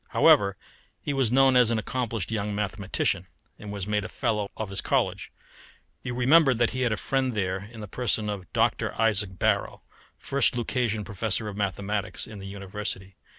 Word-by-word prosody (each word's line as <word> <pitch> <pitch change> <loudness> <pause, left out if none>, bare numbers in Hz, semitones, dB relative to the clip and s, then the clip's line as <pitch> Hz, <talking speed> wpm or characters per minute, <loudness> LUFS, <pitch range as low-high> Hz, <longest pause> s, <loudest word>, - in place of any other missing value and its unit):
However, 100 -1 +4 0.4
he 145 - -3
was 135 -4 +1
known 135 0 +5
as 125 -2 +6
an 115 - +1
accomplished 115 -3 -2
young 105 -2 -2
mathematician, 105 -1 -1 0.3
and 105 - -7
was 100 -2 -4
made 105 0 0
a - - -6
fellow 105 -2 -1
of 110 -3 -4
his 100 - +1
college. - - 0 0.7
You 125 -2 -4
remember 135 +2 +5
that 120 0 +2
he 130 - -3
had 125 -3 +2
a 110 - 0
friend 130 +3 0
there 95 0 -2
in 115 -2 -9
the 105 - -6
person 110 -1 -1
of 100 -4 -5
Dr. - - 0
Isaac 105 -4 +1
Barrow, - - 0 0.3
first 135 -3 +1
Lucasian 120 -3 -1
Professor 110 +1 0
of 100 - -7
Mathematics 100 +1 -2
in 110 -2 -10
the 95 - -8
University. 95 -1 -6
105 Hz, 180 wpm, -26 LUFS, 100-120 Hz, 0.7 s, as